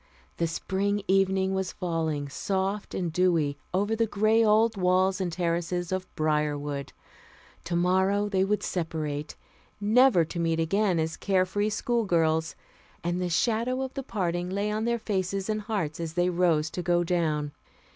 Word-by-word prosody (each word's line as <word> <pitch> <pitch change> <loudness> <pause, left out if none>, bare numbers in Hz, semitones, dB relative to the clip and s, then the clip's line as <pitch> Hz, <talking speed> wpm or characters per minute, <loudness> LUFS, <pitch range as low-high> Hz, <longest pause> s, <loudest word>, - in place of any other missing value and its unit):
The 170 - +1
spring 200 +4 -1
evening 190 0 +2
was 190 -1 -2
falling, 160 -5 -2
soft 195 +7 -2
and 175 -3 -2
dewy, 165 -5 +2 0.2
over 205 +4 +1
the 225 0 +1
gray 215 +2 +3
old 220 +1 +4
walls 185 +1 +2
and 180 -2 -1
terraces 175 +1 -1
of 185 0 -2
Briarwood. 150 -2 -1 0.7
Tomorrow 185 +4 +1
they 190 -2 +1
would 205 +2 0
separate, 155 -4 -3 0.4
never 215 -3 +5
to 170 +2 -6
meet 165 -1 +1
again 190 +3 +1
as 160 0 -1
care 190 -2 +2
free 205 +3 -1
schoolgirls; 170 -9 +1 0.5
and 175 +1 -1
the 180 - -1
shadow 235 +8 +1
of 265 - -5
the 275 - -4
parting 180 -7 -2
lay 200 +2 -1
on 215 +1 -1
their 235 0 +1
faces 195 -3 -2
and 215 0 -2
hearts 200 -8 -3
as 165 -1 -4
they 180 0 +2
rose 165 -3 +2
to 180 - -4
go 175 0 +2
down. 155 -4 0
185 Hz, 155 wpm, -27 LUFS, 165-205 Hz, 0.7 s, never